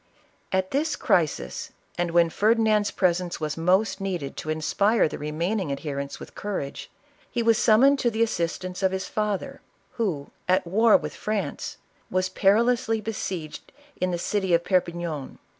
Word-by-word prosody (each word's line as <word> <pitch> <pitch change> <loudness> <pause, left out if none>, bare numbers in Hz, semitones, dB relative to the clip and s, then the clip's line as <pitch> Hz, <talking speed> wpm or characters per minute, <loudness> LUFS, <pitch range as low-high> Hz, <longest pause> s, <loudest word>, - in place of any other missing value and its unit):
At 190 0 0
this 290 +2 0
crisis, 150 - 0 0.2
and 175 0 -1
when 170 -1 +3
Ferdinand's 215 0 +3
presence 180 -1 0
was 155 -1 -2
most 190 +5 +2
needed 175 -8 -3
to 155 - -5
inspire 195 +8 +2
the - - -7
remaining 165 +4 -2
adherents 140 0 -4
with - - -10
courage, 190 -9 -5 0.4
he 235 - -1
was 230 0 +4
summoned 265 +6 +5
to 240 - +2
the 225 0 +1
assistance 180 -2 -2
of 190 -1 +2
his 190 0 -2
father, 215 +6 -2 0.4
who, 180 -12 -2 0.2
at 185 0 +3
war 215 +6 +5
with - - -6
France, 210 -2 -3 0.3
was 185 0 0
perilously 225 +4 +2
be 220 +1 -4
sieged 170 -7 -5 0.3
in 185 - -1
the 175 - -1
city 190 0 +1
of 170 - +1
Perpignan. 170 -6 -1
185 Hz, 155 wpm, -25 LUFS, 170-215 Hz, 0.4 s, summoned